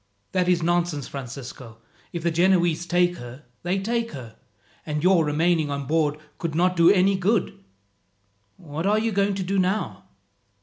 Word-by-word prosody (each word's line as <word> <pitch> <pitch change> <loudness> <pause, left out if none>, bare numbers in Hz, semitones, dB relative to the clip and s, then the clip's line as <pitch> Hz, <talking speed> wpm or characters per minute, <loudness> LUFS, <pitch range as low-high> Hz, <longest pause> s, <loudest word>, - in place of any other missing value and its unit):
"That 180 -1 +1
is 175 -2 +2
nonsense, 170 -4 0
Francisco. 125 -3 -8 0.3
If 170 -2 -5
the 170 - +1
Genoese 175 -1 +2
take 175 +1 +2
her, 120 +4 -10 0.2
they 180 +3 -1
take 230 +4 -2
her, 120 -6 -9 0.5
and 150 0 -3
your 185 -2 +5
remaining 155 +1 +1
on 140 -1 -3
board 150 0 +1 0.2
could 165 -3 -3
not 180 +2 +2
do 170 0 +6
any 195 0 +4
good. 190 - 0 0.9
What 160 0 -4
are 210 +1 +3
you 225 +1 0
going 200 0 +1
to 190 - -2
do 195 +2 0
now?" 190 +3 -1
175 Hz, 165 wpm, -24 LUFS, 150-190 Hz, 0.9 s, do